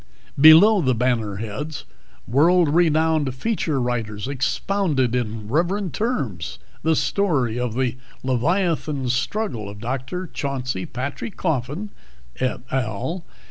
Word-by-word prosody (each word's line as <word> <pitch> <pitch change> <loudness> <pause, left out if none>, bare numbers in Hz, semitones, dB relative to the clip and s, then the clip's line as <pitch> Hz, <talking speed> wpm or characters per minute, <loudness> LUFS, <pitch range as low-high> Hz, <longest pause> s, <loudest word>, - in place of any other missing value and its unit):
Below 170 +8 +8
the 130 -5 +2
banner 115 -4 0
heads, 115 +9 -5 0.4
world 165 +6 +4
renowned 160 -3 +2
feature 160 - -1
writers 115 -3 -2
expounded 140 - 0
in 110 -3 -2
reverent 175 - 0
terms 115 - -2 0.2
the 160 +1 +2
story 140 - +1
of 125 -2 -2
the 125 -1 0 0.3
leviathan 150 0 0
struggle 130 - -1
of 100 - -9
Dr. 130 - -3
Chauncey 130 - -3
Patrick 140 - -5
Coffin 160 - -2 0.5
(_et 125 -1 -2
al. 130 - -2
135 Hz, 110 wpm, -22 LUFS, 120-165 Hz, 0.5 s, Below